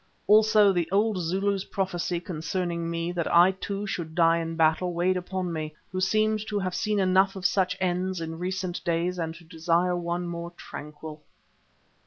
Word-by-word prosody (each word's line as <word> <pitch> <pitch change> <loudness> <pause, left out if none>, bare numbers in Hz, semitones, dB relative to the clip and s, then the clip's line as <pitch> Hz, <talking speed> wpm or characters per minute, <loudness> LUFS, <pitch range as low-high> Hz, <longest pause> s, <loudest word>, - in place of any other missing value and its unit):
Also 215 -1 +6
the 175 -3 0
old 205 0 +2
Zulu's 195 +3 0
prophecy 180 -2 -2
concerning 170 0 -3
me, 170 +1 -2
that 170 -2 -2
I 175 +2 +7
too 200 +1 -5
should 165 -5 -4
die 165 -1 +4
in 165 0 -4
battle, 165 +2 +2
weighed 180 +2 +2
upon 180 -1 -3
me, 155 -1 -4 0.2
who 185 0 -2
seemed 215 +3 +2
to 210 - -2
have 185 -2 -2
seen 210 +3 0
enough 190 +1 +3
of 190 -1 -7
such 185 -1 +2
ends 185 0 -1
in 165 0 -5
recent 185 0 -3
days 175 +1 -1
and 160 -1 -3
to 170 - -14
desire 170 +2 0
one 175 0 -2
more 170 0 -6
tranquil. 150 +1 -9
180 Hz, 175 wpm, -27 LUFS, 170-190 Hz, 0.2 s, I